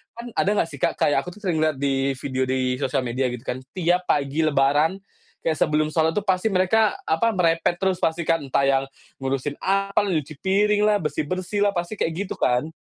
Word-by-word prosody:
kan 235 Hz, +1 st, -8 dB
ada 200 Hz, -, +2 dB
enggak 165 Hz, -, +1 dB
sih, 145 Hz, -, -9 dB
Kak? -, -, +1 dB
Kayak 145 Hz, -, +3 dB
aku 180 Hz, +1 st, -8 dB
tuh 210 Hz, -, -16 dB
sering 175 Hz, -5 st, 0 dB
lihat 155 Hz, -1 st, +1 dB
di 135 Hz, -1 st, 0 dB
video 130 Hz, 0 st, -2 dB
di 130 Hz, -1 st, 0 dB
sosial 135 Hz, -, 0 dB
media 125 Hz, +2 st, -1 dB
gitu 125 Hz, -1 st, -7 dB
kan. 125 Hz, -, -3 dB, 0.2 s
Tiap 180 Hz, 0 st, +1 dB
pagi 140 Hz, +1 st, 0 dB
lebaran, 150 Hz, +5 st, +2 dB, 0.4 s
kayak 160 Hz, -2 st, 0 dB
sebelum 155 Hz, 0 st, +2 dB
salat 160 Hz, 0 st, +2 dB
tuh 205 Hz, -, 0 dB
pasti 190 Hz, +1 st, +1 dB
mereka, 200 Hz, +3 st, +3 dB
apa? 195 Hz, +9 st, +2 dB
Merepet 165 Hz, 0 st, +2 dB
terus 190 Hz, -1 st, +1 dB
pasti 165 Hz, 0 st, 0 dB
kan. 165 Hz, -, +4 dB
Entah 135 Hz, -, +1 dB
yang 135 Hz, -1 st, +3 dB, 0.4 s
ngurusin 135 Hz, +1 st, -2 dB
apa, 195 Hz, +1 st, +1 dB
nyuci 155 Hz, -6 st, -2 dB
piring 205 Hz, +2 st, +2 dB
lah, 210 Hz, -1 st, +4 dB
bersih-bersih 185 Hz, +7 st, -1 dB
lah, 200 Hz, -, +3 dB
pasti 175 Hz, +5 st, -3 dB
kayak 160 Hz, -, 0 dB
gitu -, -, -5 dB
kan. 125 Hz, +4 st, +1 dB
160 Hz, 205 wpm, -23 LUFS, 140-190 Hz, 0.4 s, kan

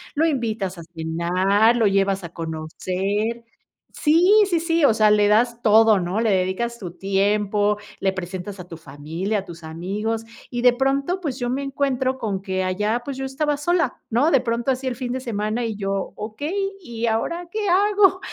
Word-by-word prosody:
lo 310 Hz, +3 st, +3 dB
invitas 220 Hz, -, -1 dB
a -, -, -8 dB
cenar, 180 Hz, +7 st, +2 dB
lo 230 Hz, -3 st, +3 dB
llevas 195 Hz, -1 st, +1 dB
a 170 Hz, -, -6 dB
conocer. 185 Hz, +8 st, -3 dB, 0.5 s
Sí, 335 Hz, +6 st, +3 dB, 0.2 s
sí, 345 Hz, -4 st, +1 dB
sí, 330 Hz, -2 st, +2 dB
o 230 Hz, -, +5 dB
sea, 215 Hz, -1 st, +4 dB
le 210 Hz, -1 st, +4 dB
das 235 Hz, +3 st, +2 dB
todo, 220 Hz, -1 st, +6 dB
¿no? 180 Hz, +5 st, -1 dB
Le 230 Hz, -, +2 dB
dedicas 195 Hz, +5 st, 0 dB
tu 180 Hz, -6 st, -7 dB
tiempo, 205 Hz, +2 st, +1 dB, 0.2 s
le 190 Hz, -1 st, +1 dB
presentas 185 Hz, +1 st, -6 dB
a 180 Hz, -, -9 dB
tu 165 Hz, -, -9 dB
familia, 160 Hz, +8 st, -4 dB
a 195 Hz, -, -8 dB
tus 170 Hz, -1 st, -11 dB
amigos, 200 Hz, +8 st, -3 dB, 0.3 s
y 240 Hz, -1 st, -2 dB
de 250 Hz, 0 st, +6 dB
pronto, 275 Hz, +7 st, 0 dB
pues, 285 Hz, -7 st, -4 dB
yo 245 Hz, -1 st, -2 dB
me 270 Hz, +2 st, -2 dB
encuentro, 265 Hz, -1 st, -1 dB
con 200 Hz, -5 st, -2 dB
que 190 Hz, -1 st, -1 dB
allá, 210 Hz, +6 st, 0 dB
pues 270 Hz, 0 st, -5 dB
yo 270 Hz, -, -3 dB
estaba 295 Hz, +2 st, -1 dB
sola, 330 Hz, -2 st, 0 dB
¿no? 250 Hz, +8 st, +3 dB
De 275 Hz, -, +4 dB
pronto 235 Hz, +1 st, -1 dB
así 260 Hz, 0 st, -1 dB
el 255 Hz, -2 st, -1 dB
fin 250 Hz, -1 st, -4 dB
de 260 Hz, -, -2 dB
semana 225 Hz, -1 st, -2 dB
y 225 Hz, -2 st, -3 dB
yo: 195 Hz, -1 st, -3 dB
"Okey, 310 Hz, -, -3 dB
¿y 235 Hz, -6 st, -4 dB
ahora, 335 Hz, +11 st, -1 dB
qué 425 Hz, 0 st, -2 dB
hago?" 395 Hz, 0 st, +4 dB
220 Hz, 190 wpm, -22 LUFS, 195-265 Hz, 0.5 s, todo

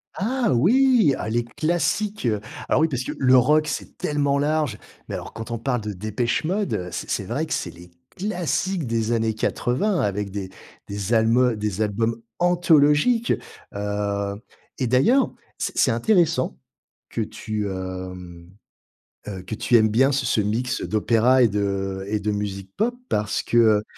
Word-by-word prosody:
Ah 240 Hz, +4 st, 0 dB
oui! 230 Hz, -, +4 dB
Ah, 110 Hz, -, -4 dB
les 120 Hz, +1 st, 0 dB
classiques. 170 Hz, -, -1 dB, 0.4 s
Alors -, -, +2 dB
oui, 160 Hz, -, +3 dB
parce 130 Hz, -2 st, -2 dB
que, -, -, -4 dB
le 130 Hz, -1 st, +5 dB
rock, 150 Hz, +5 st, +4 dB
c'est -, -, -5 dB
tellement 145 Hz, -1 st, 0 dB
large. 150 Hz, -6 st, 0 dB, 0.3 s
Mais -, -, -4 dB
alors, -, -, -6 dB
quand 115 Hz, +1 st, -7 dB
on 115 Hz, -, -1 dB
parle 120 Hz, 0 st, -1 dB
de 105 Hz, -1 st, -4 dB
Depeche 110 Hz, -, -1 dB
Mode, 155 Hz, -, -1 dB
c'est 90 Hz, -, -5 dB
c'est 100 Hz, -, -1 dB
vrai 130 Hz, +11 st, -2 dB
que 160 Hz, -, -3 dB
c'est -, -, -2 dB
les 85 Hz, +1 st, -15 dB, 0.3 s
classiques 185 Hz, -2 st, -1 dB
des 115 Hz, -1 st, 0 dB
années 110 Hz, -1 st, +1 dB
80 130 Hz, -, 0 dB
avec 100 Hz, 0 st, -1 dB
des 95 Hz, -1 st, -5 dB, 0.4 s
des 100 Hz, +2 st, -3 dB
albums 115 Hz, +2 st, +3 dB
des 105 Hz, -1 st, -3 dB
albums 115 Hz, +2 st, -1 dB, 0.2 s
anthologiques. 175 Hz, +5 st, +3 dB, 0.4 s
Heu, 100 Hz, 0 st, -2 dB, 0.4 s
et 130 Hz, -, 0 dB
d'ailleurs, 140 Hz, -, +3 dB, 0.3 s
c'est -, -, -3 dB
c'est -, -, +4 dB
intéressant 165 Hz, -, +2 dB, 0.5 s
que -, -, -3 dB
tu, 105 Hz, -1 st, -4 dB
hem, 90 Hz, -2 st, -7 dB, 0.8 s
heu, 95 Hz, -3 st, -5 dB
que 100 Hz, -, -5 dB
tu 120 Hz, -, +1 dB
aimes 110 Hz, -1 st, +5 dB
bien 130 Hz, +6 st, +3 dB
ce 135 Hz, -2 st, 0 dB
ce 115 Hz, -, +1 dB
mix 115 Hz, +5 st, -1 dB
d'opéra 115 Hz, +4 st, +3 dB
et 115 Hz, -, +4 dB
de 100 Hz, -1 st, -2 dB
et 105 Hz, +1 st, -1 dB
de 105 Hz, +1 st, 0 dB
musique 100 Hz, -2 st, -4 dB
pop 240 Hz, +3 st, +1 dB
parce 105 Hz, 0 st, 0 dB
qu'il 110 Hz, -3 st, +4 dB
115 Hz, 165 wpm, -23 LUFS, 105-155 Hz, 0.8 s, le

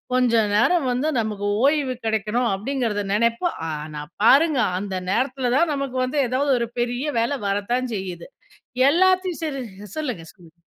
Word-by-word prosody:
கொஞ்ச 250 Hz, -2 st, +2 dB, 0.2 s
நேரம் 275 Hz, +7 st, +3 dB
வந்து 255 Hz, +5 st, 0 dB
நமக்கு 210 Hz, -2 st, -2 dB, 0.2 s
ஓய்வு 280 Hz, -3 st, +2 dB
கெடைக்கணும், 220 Hz, +2 st, 0 dB
அப்டிங்கிறத 220 Hz, 0 st, -2 dB
நெனைப்போம், 235 Hz, -, +1 dB
ஆனா 150 Hz, 0 st, -6 dB, 0.2 s
பாருங்க, 285 Hz, +4 st, +5 dB, 0.2 s
அந்த 195 Hz, -1 st, -4 dB, 0.2 s
நேரத்துலதான் 260 Hz, -, +1 dB
நமக்கு 275 Hz, -2 st, -3 dB
வந்து 265 Hz, +3 st, -2 dB
ஏதாவது 275 Hz, +3 st, +1 dB
ஒரு 235 Hz, -, -1 dB
பெரிய 245 Hz, +2 st, -1 dB, 0.2 s
வேல 240 Hz, +5 st, 0 dB
வரத்தான் 235 Hz, +6 st, -1 dB
செய்யுது. 180 Hz, -3 st, -6 dB, 0.6 s
எல்லாத்தையும் 370 Hz, +1 st, +2 dB
சரி 280 Hz, -4 st, -3 dB, 0.4 s
சொல்லுங்க, 250 Hz, -, -4 dB
சொல்லுங்க. 170 Hz, -2 st, -19 dB
245 Hz, 135 wpm, -23 LUFS, 210-280 Hz, 0.6 s, பாருங்க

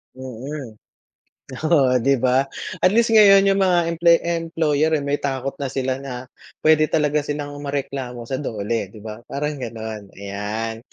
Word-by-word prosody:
Mm. 130 Hz, -2 st, -8 dB, 0.9 s
Oo, 135 Hz, -6 st, +4 dB
di 135 Hz, +4 st, +3 dB
ba, 130 Hz, +1 st, +3 dB, 0.3 s
at 185 Hz, -, +4 dB
least 230 Hz, 0 st, +3 dB
ngayon 200 Hz, -3 st, +7 dB
yung 195 Hz, 0 st, +2 dB
mga 175 Hz, -3 st, +2 dB
employ 170 Hz, 0 st, +5 dB
employer 165 Hz, -2 st, 0 dB
eh, 145 Hz, -, -2 dB
may 145 Hz, +1 st, -1 dB
takot 135 Hz, -1 st, -2 dB
na 140 Hz, -, -2 dB
sila 130 Hz, -1 st, -1 dB
na 130 Hz, -2 st, -6 dB, 0.4 s
puwede 155 Hz, 0 st, +5 dB
talaga 150 Hz, -1 st, +1 dB
silang 145 Hz, -1 st, -4 dB
mareklamo 135 Hz, -4 st, -4 dB
sa 130 Hz, +2 st, -4 dB
DOLE 110 Hz, -5 st, -2 dB
di 110 Hz, -, -12 dB
ba, 110 Hz, 0 st, -7 dB
parang 150 Hz, +1 st, -3 dB
ganon. 110 Hz, -3 st, -6 dB
Ayan, 105 Hz, +3 st, -4 dB
140 Hz, 155 wpm, -21 LUFS, 120-155 Hz, 0.9 s, ngayon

